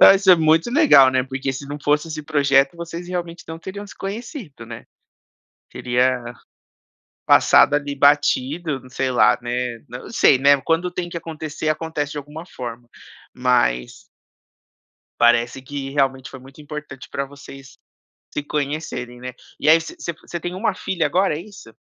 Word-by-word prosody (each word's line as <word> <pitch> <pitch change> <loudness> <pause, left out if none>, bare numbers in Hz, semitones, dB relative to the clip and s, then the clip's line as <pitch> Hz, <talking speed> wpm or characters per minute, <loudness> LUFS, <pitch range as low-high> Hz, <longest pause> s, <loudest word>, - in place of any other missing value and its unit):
Ah, - - +10
isso 195 0 -1
é 180 - +10
muito 160 +5 +2
legal, 275 - +7
né, 130 0 +1
porque 135 +1 -4
se 140 +2 -8
não 145 +1 -5
fosse 150 +2 0
esse 155 -1 -5
projeto, 140 -1 +2
vocês 170 +1 -7
realmente 175 -1 -5
não 165 +1 -8
teriam 200 +3 -7
se - - -14
conhecido, 200 - -7
né. 115 -1 -9 0.9
Teria 125 0 0 0.9
passado, 145 - +5
ali, 145 -1 -1
batido, 145 +1 +2
n 130 - -16
sei 130 0 -1
lá, 110 -2 +4
né 120 0 -3
n - - -25
não 125 - -9
sei, 140 - +5
né, 140 0 +4
quando 170 +3 0
tem 175 -1 -4
que 170 - -5
acontecer, 155 -2 -6
acontece 155 -2 -2
de 150 - -4
alguma 150 +4 -10
forma. 120 -6 -8 0.5
Mas 120 - 0 1.2
parece 120 +2 +3
que 135 0 -6
realmente 135 -2 0
foi 130 - -10
muito 135 +3 -15
importante 150 -3 -9
pra 140 - -2
vocês 135 -1 -13 0.6
se 145 - -3
conhecerem, 140 -4 -4
né. 125 0 -6 0.3
E 150 - +2
aí 160 +1 +7
você 160 - -9
você 170 - -5
você 165 +2 -8
tem 175 0 -4
1 195 +1 -1
filha 170 -5 -2
agora, 180 +2 +1
é - - -6
isso? 195 - -14
145 Hz, 170 wpm, -21 LUFS, 130-165 Hz, 1.2 s, Ah